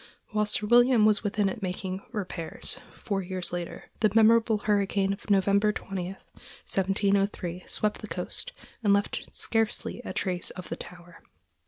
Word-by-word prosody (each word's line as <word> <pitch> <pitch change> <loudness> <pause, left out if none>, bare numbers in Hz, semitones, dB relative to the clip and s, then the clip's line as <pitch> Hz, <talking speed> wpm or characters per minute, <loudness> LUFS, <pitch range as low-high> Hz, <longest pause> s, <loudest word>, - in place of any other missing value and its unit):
While 210 -1 +1
Sir 210 0 +1
William 240 0 +6
was 210 -1 +4
within 205 -1 +1
it 195 +3 -4
making 185 0 -3
repairs, 185 -7 -3 0.2
four 200 -3 -2
years 185 -1 -2
later, 175 -1 -5
the 215 - +4
memorable 225 0 +5
hurricane 200 -1 +1
of 200 - -10
November 200 +1 +4
20, 190 -3 -5 0.5
1703, 195 -2 0
swept 210 -1 -1
the - - -6
coast, - - -2 0.3
and 205 -2 +5
left 200 0 0
scarcely 225 +1 -1
a - - -5
trace 180 -2 -2
of 180 -1 -9
the - - -2
tower. 175 -1 -12
200 Hz, 150 wpm, -28 LUFS, 185-215 Hz, 0.5 s, William